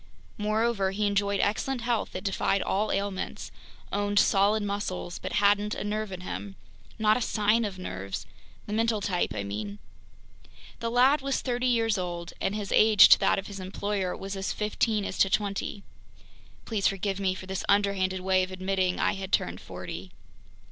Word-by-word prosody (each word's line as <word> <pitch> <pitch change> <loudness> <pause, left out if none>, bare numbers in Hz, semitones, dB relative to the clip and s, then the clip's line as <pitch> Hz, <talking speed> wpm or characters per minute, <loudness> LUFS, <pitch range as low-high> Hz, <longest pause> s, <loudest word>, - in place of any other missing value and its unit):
Moreover, 215 -1 +1
he 205 +2 -1
enjoyed 200 0 +1
excellent 240 +5 0
health 235 -1 -1
that 185 - -5
defied 195 0 0
all 210 +2 0
ailments, 195 -1 -3 0.4
owned 205 0 0
solid 205 +1 +4
muscles, 200 -3 -3
but - - -5
hadn't 205 +1 +3
a - - -4
nerve 210 0 -2
in 185 -1 -6
him, 195 +1 -6 0.4
not 215 -1 +3
a - - -3
sign 220 +1 +2
of 195 -2 -5
nerves—the 100 - -8
mental 225 0 +1
type, 185 - -1
I 100 - -2
mean. 100 0 -5 1.0
The 230 - -2
lad 255 +5 +4
was 275 0 -1
thirty 250 0 0
years 225 -4 +2
old, 175 -1 -5
and 200 - 0
his 205 -2 -4
age 215 -2 +7
to - - +8
that - - +3
of 195 - -3
his 200 -1 -8
employer 190 0 -2
was 195 +1 -5
as 195 0 -2
fifteen 215 0 0
is - - -5
to 195 - +5
twenty. 200 -1 -2 0.8
Please 215 -4 +1
forgive 195 0 -1
me 190 -1 0
for 185 - -8
this 190 0 -4
underhanded 195 -2 +2
way 185 0 +3
of 185 - -2
admitting 185 -1 -1
I - - +2
had 195 -1 -6
turned 90 +1 0
forty. 90 0 -8
200 Hz, 175 wpm, -28 LUFS, 185-215 Hz, 1.0 s, to